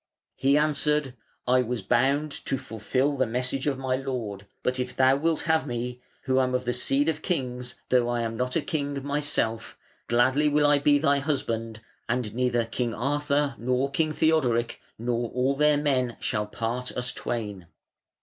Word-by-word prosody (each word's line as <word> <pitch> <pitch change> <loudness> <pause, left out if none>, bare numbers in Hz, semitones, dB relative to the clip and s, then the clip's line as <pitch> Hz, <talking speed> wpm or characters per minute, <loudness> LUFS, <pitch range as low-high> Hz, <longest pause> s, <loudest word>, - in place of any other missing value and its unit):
He 140 +2 +3
answered: 150 -2 +1 0.3
"I 125 +1 +5
was 120 -3 -3
bound 140 +8 +2
to 135 - 0
fulfil 130 +6 -1
the 130 -2 +2
message 125 +4 -2
of 140 -2 +1
my 130 -1 -1
lord; 115 -7 -4 0.2
but 125 0 0
if 125 0 -3
thou 130 0 +5
wilt 160 +3 0
have 160 -2 +1
me, 125 0 -4 0.2
who 130 -1 +2
am 130 -1 +1
of 125 0 -1
the 125 - 0
seed 140 +4 +1
of 155 -1 0
kings, 125 -7 -3
though 125 -1 +3
I 120 -1 0
am 115 -1 -2
not 125 +2 -2
a 165 - +1
king 140 -3 -3
myself, 145 -6 -1 0.3
gladly 130 +5 +3
will 150 0 +3
I 145 0 +5
be 145 0 +4
thy 140 -1 +2
husband, 115 -6 -2 0.3
and 120 -3 -1
neither 120 -1 +1
King 115 +1 -2
Arthur 145 +1 0
nor 125 +3 0
King 155 +2 +1
Theodoric 130 -8 +1 0.2
nor 120 0 -1
all 130 +2 +1
their 150 +1 +4
men 130 -5 0
shall 105 0 -1
part 120 +4 -3
us 125 0 -2
twain". 105 -7 -4
130 Hz, 175 wpm, -26 LUFS, 120-145 Hz, 0.3 s, I